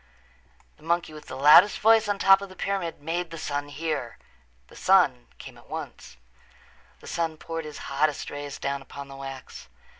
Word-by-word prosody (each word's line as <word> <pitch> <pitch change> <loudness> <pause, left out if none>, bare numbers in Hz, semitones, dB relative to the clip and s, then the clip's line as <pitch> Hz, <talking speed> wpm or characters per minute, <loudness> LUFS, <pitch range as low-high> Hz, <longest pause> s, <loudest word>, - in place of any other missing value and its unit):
The - - -24
monkey 170 -1 -1
with 150 - -12
the 130 - -7
loudest 150 +9 +7
voice 220 0 +4
on 205 - 0
top 195 0 +6
of 200 - -7
the 185 - -13
pyramid 180 -5 -3
made 170 +2 -2
the 165 - -8
sun 145 -1 -3
hear. 150 -5 -4 0.5
The - - -17
sun 160 -11 +3
came - - -11
at - - -21
once. - - -8 0.8
The - - -13
sun 165 -2 -2
poured 165 0 -6
his 150 -1 -8
hottest 145 +1 -1
rays 145 -1 -6
down 140 0 -3
upon 140 +1 -10
the 135 - -10
wax. 135 - -9
155 Hz, 180 wpm, -26 LUFS, 140-175 Hz, 0.8 s, loudest